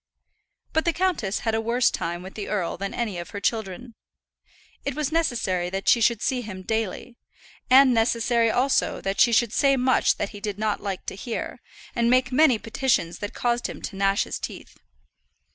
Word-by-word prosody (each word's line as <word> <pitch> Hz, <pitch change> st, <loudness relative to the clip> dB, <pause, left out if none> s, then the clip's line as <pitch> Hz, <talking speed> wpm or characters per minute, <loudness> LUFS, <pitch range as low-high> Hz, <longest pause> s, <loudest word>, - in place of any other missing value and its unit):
But 320 Hz, -, +1 dB
the 340 Hz, -, +2 dB
countess 340 Hz, -, -1 dB
had 225 Hz, -, -1 dB
a 220 Hz, -, +1 dB
worse 235 Hz, +2 st, +2 dB
time 175 Hz, +1 st, -4 dB
with 190 Hz, -, -9 dB
the 210 Hz, -, -6 dB
earl 190 Hz, -5 st, -1 dB
than 195 Hz, +2 st, -4 dB
any 215 Hz, -7 st, -3 dB
of 170 Hz, -, -7 dB
her 200 Hz, -, -6 dB
children. 220 Hz, +2 st, -3 dB, 0.9 s
It 280 Hz, -2 st, -3 dB
was 300 Hz, -1 st, -2 dB
necessary 235 Hz, -, 0 dB
that 195 Hz, +1 st, -5 dB
she 235 Hz, -, +5 dB
should 225 Hz, 0 st, +2 dB
see 255 Hz, -2 st, 0 dB
him 190 Hz, -5 st, -8 dB
daily, 220 Hz, +3 st, -3 dB, 0.5 s
and 260 Hz, 0 st, +7 dB
necessary 230 Hz, 0 st, +2 dB
also 255 Hz, +4 st, +1 dB
that 195 Hz, 0 st, -1 dB
she 235 Hz, -, +6 dB
should 230 Hz, -1 st, +2 dB
say 275 Hz, -1 st, +3 dB
much 255 Hz, 0 st, +2 dB
that -, -, -2 dB
he 205 Hz, -, -10 dB
did 205 Hz, -1 st, -4 dB
not 215 Hz, -1 st, -1 dB
like 195 Hz, -2 st, -4 dB
to -, -, -5 dB
hear, 225 Hz, +4 st, -5 dB, 0.4 s
and 235 Hz, 0 st, +2 dB
make 255 Hz, +1 st, +3 dB
many 260 Hz, -2 st, +5 dB
petitions 225 Hz, -6 st, -1 dB
that 205 Hz, -, -6 dB
caused 240 Hz, 0 st, 0 dB
him -, -, -8 dB
to 200 Hz, -, -5 dB
gnash 195 Hz, +1 st, +2 dB
his -, -, -5 dB
teeth. -, -, -8 dB
225 Hz, 195 wpm, -24 LUFS, 200-250 Hz, 0.9 s, and